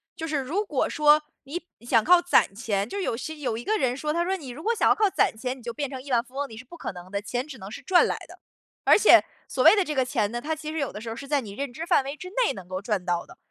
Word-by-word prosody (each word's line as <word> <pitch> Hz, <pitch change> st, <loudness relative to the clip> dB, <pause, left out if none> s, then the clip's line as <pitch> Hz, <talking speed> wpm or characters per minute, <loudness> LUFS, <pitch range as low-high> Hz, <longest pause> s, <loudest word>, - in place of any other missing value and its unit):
就 325 Hz, -3 st, -5 dB
是 305 Hz, -2 st, -1 dB
如 310 Hz, +11 st, -1 dB
果 300 Hz, -10 st, 0 dB
说 300 Hz, 0 st, +4 dB, 0.2 s
你 285 Hz, +6 st, -5 dB, 0.2 s
想 235 Hz, -2 st, +3 dB
靠 355 Hz, +1 st, +6 dB
攒 350 Hz, -, +3 dB
钱 205 Hz, -1 st, -1 dB
就 400 Hz, -, -6 dB
是 395 Hz, -, -2 dB
有 230 Hz, -, -1 dB
些 310 Hz, +6 st, -5 dB
有 255 Hz, -6 st, -2 dB
一 235 Hz, -, -6 dB
个 435 Hz, -, +1 dB
人 255 Hz, -7 st, 0 dB
说， 300 Hz, +2 st, -2 dB
他 340 Hz, +1 st, +1 dB
说 380 Hz, +2 st, 0 dB
你 280 Hz, -7 st, -9 dB
如 265 Hz, +6 st, -8 dB
果 465 Hz, +6 st, 0 dB
想 -, -, +2 dB
要 -, -, +6 dB
靠 425 Hz, -2 st, +2 dB
攒 370 Hz, -, +1 dB
钱， 250 Hz, +3 st, -4 dB
你 255 Hz, -, -15 dB
就 235 Hz, 0 st, -5 dB
变 285 Hz, +2 st, -3 dB
成 260 Hz, -1 st, -6 dB
亿 275 Hz, 0 st, -9 dB
万 235 Hz, -1 st, +3 dB
富 265 Hz, 0 st, -21 dB
翁， 285 Hz, +1 st, -2 dB
你 220 Hz, -, -10 dB
是 225 Hz, -, -9 dB
不 305 Hz, +7 st, -13 dB
可 -, -, -4 dB
能 180 Hz, -1 st, -11 dB
的， 200 Hz, -, -1 dB
钱 245 Hz, +6 st, -3 dB
只 280 Hz, -4 st, -9 dB
能 195 Hz, -3 st, -9 dB
是 250 Hz, -, -8 dB
赚 350 Hz, +6 st, +4 dB
来 -, -, -1 dB
的。 -, -, -14 dB, 0.5 s
而 -, -, +7 dB
且， 425 Hz, -, +7 dB, 0.2 s
所 -, -, -1 dB
谓 -, -, +8 dB
的 400 Hz, -, +3 dB
这 305 Hz, -4 st, -4 dB
个 260 Hz, -1 st, +2 dB
钱 210 Hz, -4 st, 0 dB
呢， 240 Hz, -, -3 dB
它 315 Hz, +5 st, -2 dB
其 310 Hz, 0 st, -6 dB
实 320 Hz, -, -5 dB
有 280 Hz, -4 st, -1 dB
的 210 Hz, -, -7 dB
时 230 Hz, -, -6 dB
候 225 Hz, -, -5 dB
是 275 Hz, +3 st, -8 dB
在 290 Hz, -1 st, +1 dB
你 210 Hz, -5 st, -9 dB
认 265 Hz, +2 st, -5 dB
知 320 Hz, -, -5 dB
范 -, -, +4 dB
围 275 Hz, +2 st, -5 dB
之 360 Hz, +5 st, -9 dB, 0.2 s
内 -, -, +1 dB
能 190 Hz, -3 st, -10 dB
够 185 Hz, 0 st, -4 dB
赚 200 Hz, -3 st, -1 dB
到 175 Hz, -1 st, -1 dB
的。 -, -, -16 dB
270 Hz, 355 characters per minute, -26 LUFS, 230-315 Hz, 0.5 s, 谓